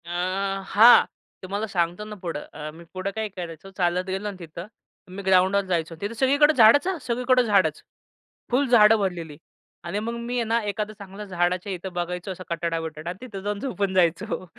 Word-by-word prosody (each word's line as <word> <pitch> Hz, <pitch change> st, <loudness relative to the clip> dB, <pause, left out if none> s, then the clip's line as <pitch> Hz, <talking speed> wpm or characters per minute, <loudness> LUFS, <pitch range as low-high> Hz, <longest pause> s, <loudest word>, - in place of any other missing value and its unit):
अ, -, -, -11 dB, 0.6 s
हां. 225 Hz, +5 st, +7 dB, 0.4 s
तुम्हाला 200 Hz, +4 st, -3 dB
सांगतो 175 Hz, 0 st, -1 dB
ना, 215 Hz, 0 st, -8 dB
पुढं 165 Hz, -4 st, -4 dB
अ, 150 Hz, 0 st, -6 dB
मी 165 Hz, +2 st, -13 dB
पुढं 185 Hz, +1 st, -3 dB
काय 220 Hz, -1 st, -2 dB
करायचं 175 Hz, -1 st, -8 dB
चालत 180 Hz, 0 st, +1 dB
गेलो 190 Hz, +2 st, -3 dB
ना 200 Hz, -, -7 dB
तिथं. 170 Hz, +2 st, -8 dB, 0.4 s
मी 195 Hz, +2 st, -8 dB
ग्राउंडवर 190 Hz, +1 st, +3 dB
जायचो 170 Hz, -3 st, -2 dB
तिथं. 205 Hz, +3 st, -3 dB
सगळीकडे 285 Hz, +5 st, +4 dB
झाडाचं 285 Hz, +8 st, +6 dB
हं, 370 Hz, -, -4 dB
सगळीकडं 250 Hz, +1 st, +2 dB
झाडच. 195 Hz, -9 st, +2 dB, 0.7 s
फुल 270 Hz, +3 st, +2 dB
झाडं 225 Hz, -2 st, +7 dB
भरलेली 170 Hz, -6 st, -3 dB, 0.5 s
आणि 175 Hz, +4 st, -3 dB
मग 230 Hz, +2 st, -3 dB
मी 240 Hz, +1 st, -4 dB
आहे 240 Hz, -, +1 dB
ना 230 Hz, +1 st, +1 dB
एखादं 210 Hz, +1 st, -3 dB
चांगलं 200 Hz, +1 st, -9 dB
झाडाच्या 180 Hz, +1 st, -1 dB
इथं 185 Hz, +1 st, -7 dB
बघायचो 180 Hz, +2 st, -4 dB
असा 185 Hz, 0 st, -8 dB
कठडा, 170 Hz, 0 st, -1 dB
बिठडा 160 Hz, 0 st, -6 dB
आणि 180 Hz, -, -6 dB
तिथं 200 Hz, -5 st, -7 dB
जाऊन 205 Hz, 0 st, -2 dB
झोपून 200 Hz, -6 st, -2 dB
जायचो. 185 Hz, +2 st, +1 dB
195 Hz, 185 wpm, -24 LUFS, 175-220 Hz, 0.7 s, हां